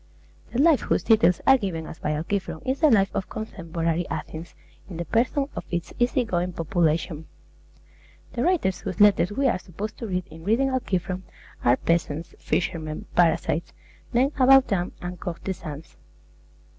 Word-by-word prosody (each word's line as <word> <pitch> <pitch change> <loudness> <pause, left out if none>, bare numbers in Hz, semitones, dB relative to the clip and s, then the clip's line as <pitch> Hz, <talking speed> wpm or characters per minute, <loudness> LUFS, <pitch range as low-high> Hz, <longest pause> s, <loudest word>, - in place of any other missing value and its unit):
The - - -3
life 305 -1 +5
whose - - 0
details 220 -6 +4
are 270 -1 +6
given 170 -6 -3
us 160 - -9
by 150 - -1
Alciphron 190 +9 -3
is 260 +1 -1
the 310 - +5
life 200 -5 +4
of 190 - -3
contemporary 170 -5 -3
Athens 160 +2 -6 0.3
in 175 - -7
the 170 - -3
persons 265 - +1
of - - -4
its 175 -1 -3
easy 245 +2 +2
going 180 -3 -1
population. 165 -1 0 1.1
The 240 - -2
writers 285 - +1
whose 190 -3 -5
letters 205 -2 +5
we 270 +6 +1
are 230 - +1
supposed 200 +5 -7
to 230 - -4
read 180 -2 -2
in 160 +1 -11
reading 230 +8 +2
Alciphron 185 -8 -2 0.4
are 120 +1 +4
peasants, 165 -1 -1
fishermen, 155 -2 -2
parasites, 170 -1 +2 0.4
men 260 +4 +3
about 265 0 +7
town, 180 -3 -1
and 180 0 -5
courtesans. 165 -3 -6
185 Hz, 155 wpm, -25 LUFS, 165-230 Hz, 1.1 s, about